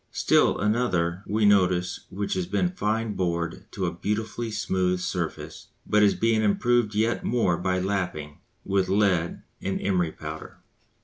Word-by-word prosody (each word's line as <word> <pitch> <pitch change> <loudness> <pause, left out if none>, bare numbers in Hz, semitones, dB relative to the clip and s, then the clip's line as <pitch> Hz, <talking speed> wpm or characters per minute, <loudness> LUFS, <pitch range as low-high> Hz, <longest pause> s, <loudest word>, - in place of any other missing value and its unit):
Still - - +3
another 95 -6 0
we 105 +1 +1
notice 90 -3 +2
which 100 +1 -3
has 95 -2 -2
been 95 -2 +1
"fine 110 +2 -1
bored" 85 0 -2
to 95 - -2
a 85 - -2
beautifully 110 +5 -3
smooth 95 -4 0
surface 90 - -4 0.2
but 105 - +3
is 105 -1 +4
being 115 -1 +2
improved 110 +1 +2
yet 110 +3 +1
more 115 -8 +1
by 90 +1 -1
"lapping" 90 -6 -3 0.3
with 95 -1 +1
lead 95 -4 +1 0.2
and 95 - -2
emery 90 -4 0
powder. 80 +1 -8
95 Hz, 145 wpm, -26 LUFS, 90-105 Hz, 0.3 s, is